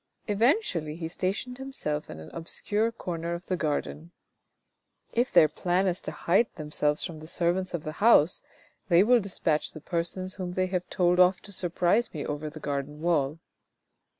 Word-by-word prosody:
Eventually 205 - +1
he 165 -1 -4
stationed 195 +9 -3
himself 155 - -3
in 75 - -8
an 80 - -10
obscure 205 +6 -1
corner 170 -6 -4
of 170 - -9
the 185 - -1
garden. 155 0 -3 0.5
" - - -53 0.3
If 245 +3 +1
their 155 - +7
plan 175 +5 0
is 185 -1 0
to - - -5
hide 195 +7 +2
themselves 150 -1 0
from 165 -3 -7
the 155 - -10
servants 175 +2 0
of 160 - -5
the 155 - -4
house, 190 -7 +5 0.5
they 175 +1 +6
will 245 +3 +5
despatch 180 -6 -1
the - - -8
persons 175 +3 -2
whom 180 -2 -5
they 185 0 +1
have 180 -1 -3
told 180 0 +2
off 180 +1 +5
to 205 - -9
surprise 180 +4 +1
me 150 - -3
over 150 +1 -3
the 155 +1 -10
garden 145 0 -4
wall. 155 -3 +1
175 Hz, 180 wpm, -28 LUFS, 155-190 Hz, 0.5 s, their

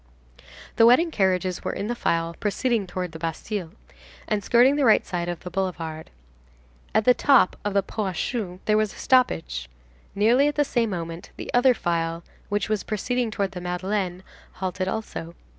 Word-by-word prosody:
The 225 - +7
wedding 320 +8 +5
carriages 185 - 0
were - - -2
in - - -3
the 235 - -1
file 165 -7 -1
proceeding 215 0 0
towards 180 -2 -4
the 160 - -8
Bastille, 165 +3 -4 0.6
and 210 -2 -1
skirting 245 +6 +5
the 290 - +1
right 225 -4 +5
side 175 -1 -3
of 175 -2 -5
the 180 - -8
Boulevard. 165 -4 -3 0.9
At 220 - +3
the 250 - +7
top 260 -5 +4
of 205 -1 -2
the 200 - +3
Pont 210 0 -3
aux 180 - -6
Choux, 190 -6 -3
there 215 0 +3
was 215 -2 0
a - - -14
stoppage. 65 - +1 0.5
Nearly 235 +8 +4
at 295 - -1
the 290 - +2
same 235 -4 0
moment, 170 -2 -5
the - - -7
other 245 +1 +5
file, 165 -2 -2 0.3
which 205 -2 0
was 215 -2 0
proceeding 240 +3 -1
towards 200 -3 -2
the 180 - -6
Madeleine, 180 +1 -2 0.3
halted 185 0 -3
also. 175 -5 -5
195 Hz, 180 wpm, -24 LUFS, 175-230 Hz, 0.9 s, The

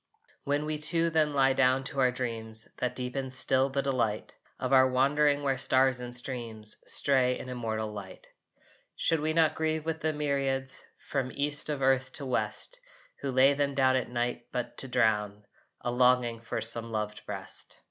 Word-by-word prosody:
When 145 +1 0
we 155 0 -2
two 165 +2 +2
then 155 -2 +2
lie 135 -1 +4
down 130 0 +3
to 135 +1 -5
our 130 -1 +5
dreams 115 -3 -2
That 125 0 -2
deepen 130 +1 -3
still 130 +1 +2
the 135 0 -1
delight 120 -6 -1 0.3
Of 130 +1 -1
our 130 0 +6
wandering 145 +3 +2
where 135 -2 0
stars 130 -1 +3
and 125 0 -5
streams 115 -4 -4
Stray 130 -2 +3
in 130 - -8
immortal 110 -3 -3
light, 95 -3 -9 0.7
Should 165 - +1
we 155 +1 0
not 160 -1 +3
grieve 160 -1 -1
with 160 -1 -2
the 160 -1 0
myriads 135 -3 -1
From 130 -2 -3
East 145 +1 0
of 145 -3 -2
earth 130 0 +2
to 140 - -5
West - - -2 0.4
Who 140 - -3
lay 130 +2 +5
them 140 -1 -1
down 130 -1 +3
at 130 - -1
night 120 0 -2
but 125 -1 -4
to 135 - -5
drown 105 -4 +1 0.4
A 120 - -2
longing 125 -2 +3
for 115 -1 -4
some 115 +1 0
loved 105 -1 -3
breast? - - -4
130 Hz, 180 wpm, -29 LUFS, 120-140 Hz, 0.7 s, our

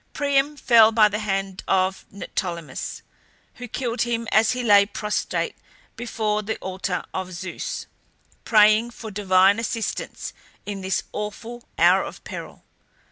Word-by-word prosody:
Priam 285 0 +1
fell 230 -4 +6
by 215 -1 +6
the 210 +1 -2
hand 195 -2 -2
of 190 0 +1
Neoptolemus, 170 -7 -5 0.5
who 245 - -7
killed 240 0 -3
him 230 -1 -1
as 215 +2 +4
he 250 0 -3
lay 205 -3 +7
prostrate 210 +1 -2 0.4
before 220 -2 -1
the 220 +1 -3
altar 185 -1 -3
of 185 -1 -4
Zeus, 175 +1 -5 0.6
praying 215 +1 +5
for 225 -2 -9
divine 195 0 +4
assistance 230 -1 -4 0.3
in 200 -1 -5
this 190 0 -1
awful 225 +3 -6
hour - - +5
of - - -9
peril. - - -8
210 Hz, 135 wpm, -23 LUFS, 195-230 Hz, 0.6 s, lay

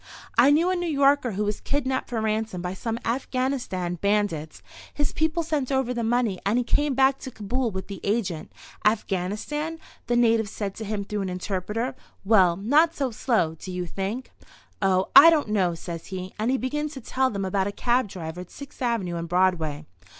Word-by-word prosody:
I 245 +4 +6
knew 325 +5 +4
a - - +1
New 350 -1 -2
Yorker 280 -4 +3
who 205 +2 -1
was 210 0 -2
kidnapped 265 -2 -1
for 235 -2 -2
ransom 220 -3 -1
by 180 +1 -3
some 225 +4 -3
Afghanistan 245 -8 -2
bandits. 200 -7 0 0.3
His 290 -2 -1
people 320 +2 0
sent 300 -5 -1
over 265 -2 +1
the 235 -1 -2
money 225 -4 +1
and 205 +4 +1
he 250 - +2
came 285 +3 +1
back 270 +1 +4
to - - -7
Kabul 240 +2 -2
with 190 -2 -5
the 200 -2 -8
agent. 200 -6 -1 0.3
'Afghanistan?' 215 - -1 0.3
the 240 - +1
natives 225 -3 +3
said 200 -2 -4
to 220 - -5
him 205 -1 -2
through 210 +1 -3
an 190 - -2
interpreter. 195 +6 -3 0.3
'Well, 190 -5 +5
not 300 - +3
so 270 -3 -1
slow, 220 -8 +1
do 175 +3 -9
you 180 0 -3
think?' 195 +8 -4 0.5
'Oh, 190 -1 +2
I 330 - +11
don't 305 -8 +2
know,' 185 -5 +1
says 165 0 -7
he, 185 -1 -6
and 220 +3 +1
he 265 - +2
begins 295 +4 -2
to 265 - -7
tell 260 +3 +1
them 200 -4 -3
about 190 +1 0
a - - -2
cab 240 +3 +1
driver 175 -3 -6
at 180 - -10
Sixth 280 -1 -12
avenue 220 -8 -1
and 170 0 -5
Broadway. 165 -5 +1
220 Hz, 195 wpm, -25 LUFS, 190-260 Hz, 0.5 s, I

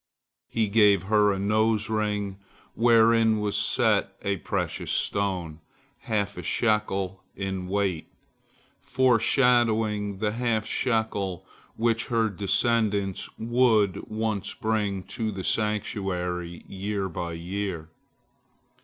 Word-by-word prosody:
He 110 -2 0
gave 100 -2 +4
her 105 +1 +3
a 100 - -1
nose 110 +2 +1
ring, 105 -3 -2 0.3
wherein 115 -1 +4
was 105 -1 -1
set - - +1
a 100 -1 0
precious 80 - -3
stone, 90 -6 -1 0.4
half 100 -2 -2
a - - -4
shekel 100 -4 0
in 95 -2 -4
weight, 95 -4 -1 0.7
foreshadowing 115 -5 +2
the 105 +1 0
half 115 -1 0
shekel 100 -7 -1 0.3
which 115 0 0
her 115 -3 +1
descendants 100 0 0
would 115 -4 +2
once 110 -2 -2
bring 105 -4 -1
to 110 0 -4
the 95 -2 -6
sanctuary 90 -5 -2
year 100 0 -3
by 85 -1 -5
year. 85 -1 -4
105 Hz, 105 wpm, -26 LUFS, 95-110 Hz, 0.7 s, gave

